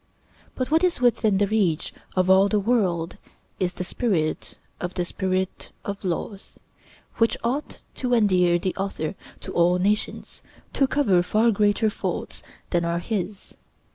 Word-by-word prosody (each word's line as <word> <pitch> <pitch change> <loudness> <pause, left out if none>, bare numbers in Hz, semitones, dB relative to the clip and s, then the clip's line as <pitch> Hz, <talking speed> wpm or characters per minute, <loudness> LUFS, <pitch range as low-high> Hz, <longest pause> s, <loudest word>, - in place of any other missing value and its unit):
But 255 +2 -3
what 320 +3 +4
is 360 -6 +2
within 225 -4 +3
the 205 - +3
reach 195 -7 0 0.2
of 185 -1 +2
all 190 +1 +6
the 210 - +2
world 190 -7 0 0.4
is 180 -1 -1
the - - -3
spirit 180 -6 -1 0.2
of 175 +1 -4
the 180 - 0
'Spirit 185 0 -2 0.2
of 200 0 -5
Laws,' 190 +2 -4 0.6
which 230 0 +2
ought 260 +6 -3 0.2
to 250 -2 +2
endear 180 -6 +4
the 185 +1 -2
author 190 -5 -2 0.3
to - - -7
all 175 +1 +4
nations, 205 +3 -1 0.3
to 275 - +3
cover 205 -12 +3
far 215 +6 +3
greater 210 +1 +2
faults - - -4 0.3
than 175 -1 +2
are 170 0 0
his. 200 +1 -4
195 Hz, 150 wpm, -24 LUFS, 180-220 Hz, 0.6 s, all